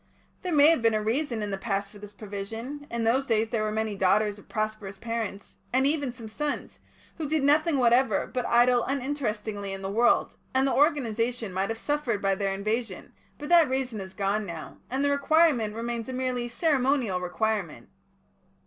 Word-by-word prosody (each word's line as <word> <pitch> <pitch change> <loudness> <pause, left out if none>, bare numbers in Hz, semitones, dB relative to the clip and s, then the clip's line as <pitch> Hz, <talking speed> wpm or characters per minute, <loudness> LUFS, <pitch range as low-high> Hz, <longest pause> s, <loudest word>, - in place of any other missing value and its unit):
There 365 - -3
may 295 -1 +7
have 330 - +1
been 230 -1 +3
a 215 - 0
reason 235 0 -1
in 205 - -3
the 195 - -3
past 200 -1 -2
for 205 - -13
this 205 0 -10
provision; 225 +8 -6
in 235 -1 -2
those 260 +4 +2
days 220 -1 +1
there 230 -3 0
were 215 0 -1
many 220 -1 -2
daughters 205 +2 +2
of - - -19
prosperous 215 -2 -3
parents 225 -3 -5
and 260 +2 +3
even 285 -2 +1
some 235 -2 -10
sons 290 +7 -4 0.4
who 305 -3 -3
did 310 -2 +1
nothing 300 +2 +3
whatever 240 -3 +3
but 250 -1 -3
idle 240 0 +4
uninterestingly 220 -8 -3
in 195 0 -7
the 195 - -3
world, 235 +3 +3 0.2
and 265 +1 +4
the - - +1
organisation 240 - +1
might 190 +2 -1
have 225 - -2
suffered 280 -4 -1
by 195 -1 +1
their 195 0 -1
invasion, 215 +4 -3 0.2
but 295 +1 -7
that 340 -5 +6
reason 260 -4 -2
has 190 0 -8
gone 200 +1 0
now, 170 -5 -8
and 270 +3 0
the 285 - +2
requirement 280 -6 +3
remains 235 +1 -4
a - - -4
merely 250 -1 -2
ceremonial 260 - +1
requirement. 180 - -2
230 Hz, 190 wpm, -27 LUFS, 210-270 Hz, 0.4 s, may